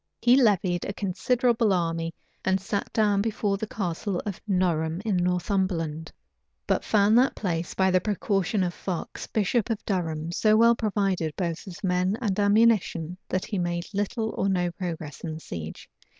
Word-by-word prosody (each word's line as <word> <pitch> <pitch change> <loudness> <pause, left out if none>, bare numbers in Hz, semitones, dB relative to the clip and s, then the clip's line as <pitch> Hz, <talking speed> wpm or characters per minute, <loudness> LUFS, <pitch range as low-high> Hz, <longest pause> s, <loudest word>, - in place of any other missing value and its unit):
He 240 +1 +5
levied 195 -8 +3
a 200 - -3
considerable 230 +3 +1
army, 165 -2 0 0.3
and 190 0 +2
sat 200 +1 -3
down 205 -2 +2
before 210 -2 0
the 220 - -4
Castle 185 -1 -2
of 205 -3 -5
Norham, 170 -4 +1
in 210 -4 +1
Northumberland; 180 -3 -1 0.5
but - - +1
found 215 +2 +4
that 260 - +2
place, 170 -4 -2
by 190 0 +3
the 185 0 +3
precaution 200 -1 0
of 175 -1 -1
Fox, 180 -2 -5
bishop 220 +2 0
of 225 -2 -3
Durham, 165 -4 -2
so 215 +4 +3
well 235 +1 +6
provided 195 -8 -1
both 170 0 -3
with 180 +1 -9
men 185 +2 +1
and 210 -5 -1
ammunition, 205 -5 +3
that 185 - -1
he 200 - -3
made 175 0 -1
little 215 +2 -1
or 195 - 0
no 180 -2 +1
progress 165 -5 -6
in 160 -2 -4
the - - -7
siege. 80 - -7
190 Hz, 165 wpm, -26 LUFS, 175-210 Hz, 0.5 s, well